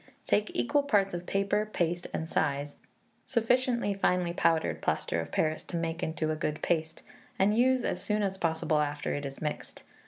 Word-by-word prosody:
Take 210 +1 +2
equal 285 +4 +2
parts 205 -10 +2
of 175 0 -5
paper, 200 +1 +1
paste, 175 -1 -1
and 160 - -3
size, 145 -2 -1 0.5
sufficient 245 +1 +1 0.2
finely 180 -1 +2
powdered 165 -2 +1
plaster 85 - 0
of 80 - -8
Paris 155 0 0
to 170 - -4
make 165 0 -2
into 160 -1 -1
a - - 0
good 155 -1 -3
paste, 160 -2 -1 0.3
and 200 +2 +3
use 255 +1 +3
as - - -1
soon 210 -1 0
as 190 -1 -2
possible 160 -1 +1
after 145 0 -1
it 145 -1 -3
is 135 +3 -8
mixed. 150 - -5
170 Hz, 180 wpm, -30 LUFS, 155-210 Hz, 0.5 s, and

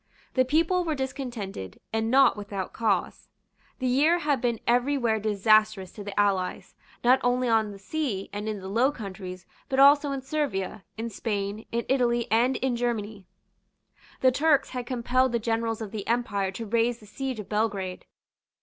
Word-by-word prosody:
The 255 -1 +3
people 330 +6 +2
were 320 -3 -1
discontented, 245 - -5
and 225 0 0
not 265 0 +5
without 200 -3 -5
cause. 210 -6 -1 0.5
The 260 - -4
year 285 +7 +4
had 295 -6 0
been 235 -3 0
every 250 +4 +2
where 225 -4 +1
disastrous 215 -2 +2
to 205 - -9
the 200 0 -4
allies, 195 -3 0 0.3
not 255 +2 +5
only 250 +1 +2
on 220 -2 +2
the 200 - -9
sea 205 -2 -3
and 210 +1 -3
in 210 -2 -4
the 190 - -7
Low 235 +8 +2
Countries, 185 -6 -8 0.2
but 265 - -1
also 285 +1 +6
in 270 -1 -4
Servia, 240 -10 -2
in 230 +1 -4
Spain, 205 0 -3
in 235 0 -1
Italy, 240 -3 +2
and 240 +4 +3
in 260 -1 0
Germany. 220 -5 -3 0.9
The 260 - +5
Turks 290 +1 +2
had 250 -2 -5
compelled 255 0 +1
the - - +3
generals 225 0 -1
of 205 - -7
the 210 -3 -6
Empire 220 -5 0
to 210 +4 -6
raise 230 +2 +1
the 215 - -16
siege 260 +3 -4
of 210 - -7
Belgrade. 200 -4 -2
230 Hz, 175 wpm, -27 LUFS, 205-260 Hz, 0.9 s, also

